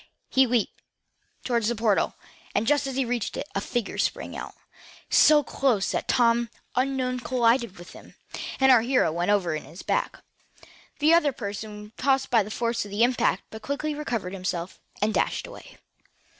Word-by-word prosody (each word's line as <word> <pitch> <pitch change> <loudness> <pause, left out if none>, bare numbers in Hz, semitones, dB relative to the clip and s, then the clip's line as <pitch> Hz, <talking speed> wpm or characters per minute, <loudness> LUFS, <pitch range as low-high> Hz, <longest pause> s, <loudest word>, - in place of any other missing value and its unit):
He 265 - +4
fairly 245 0 +2
leaped 220 - -4 0.6
toward 235 -2 +1
the 240 +2 +1
portal, 215 -2 +1 0.4
and, 215 - +2
just 290 +2 +2
as 265 - -4
he 270 -1 +1
reached 235 -3 -2
it, - - -4
a - - -1
figure 240 -5 -3
sprang - - -1
out. - - -7 0.6
So 300 -1 +6
close 250 -8 0
was - - 0
Tom 235 -1 +3
that 230 - -21 0.2
the 255 - +3
unknown 255 -1 -1
collided 235 -4 +1
with 175 +1 -11
him, - - -14 0.4
and 265 0 +6
our 245 -3 +7
hero 250 -7 +2
went 175 +4 -1
over 190 -6 +2
on 155 - -4
his 170 - -11
back. - - -2 0.7
The 310 +2 +4
other 335 -4 +4
person 210 -2 -6
was 210 - -13
tossed 270 0 +1
back 235 - +5
by - - +4
the 205 - -9
force 230 +1 -1
of 205 - -9
the 205 +3 +1
impact, 245 0 +2
but 220 - -8
quickly 290 +4 -2
recovered 235 -11 -3
himself, 180 -2 -4 0.2
and 215 +1 +1
dashed - - 0
away. - - -12
235 Hz, 195 wpm, -26 LUFS, 210-265 Hz, 0.7 s, our